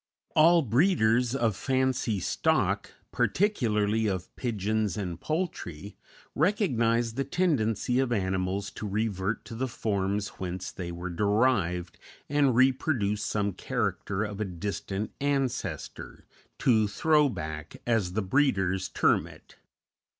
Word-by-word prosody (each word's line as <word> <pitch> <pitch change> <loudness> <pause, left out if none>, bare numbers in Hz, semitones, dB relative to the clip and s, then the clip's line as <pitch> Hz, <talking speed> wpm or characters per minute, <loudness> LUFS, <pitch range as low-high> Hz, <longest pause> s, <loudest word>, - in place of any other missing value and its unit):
All 165 +2 +6
breeders 125 - +3
of 115 -6 +1
fancy 130 -2 0
stock, 85 - +1 0.2
particularly 110 - +1
of 95 -3 -3
pigeons 110 -4 -1
and 90 -5 -4
poultry, 105 - -4 0.4
recognize 120 - +1
the 135 +4 -1
tendency 130 - +1
of 130 -2 +1
animals 95 -1 -1
to 105 - -6
revert 105 0 -2
to 115 - -9
the 130 +4 -2
forms 100 -3 -1
whence 90 0 -4
they 85 -2 -6
were 85 +1 -5
derived 95 -3 +1 0.3
and 140 -3 +2
reproduce 125 -5 +2
some 100 -1 -1
character 100 -2 -2
of 105 -1 -5
a - - 0
distant 100 +2 -4
ancestor; 140 -3 -2 0.3
to 110 -4 +3
"throw 150 +7 +3
back," 80 - -6
as 110 -7 +1
the 110 +1 0
breeders 95 -5 +1
term - - +2
it. - - -16
110 Hz, 120 wpm, -28 LUFS, 95-130 Hz, 0.4 s, All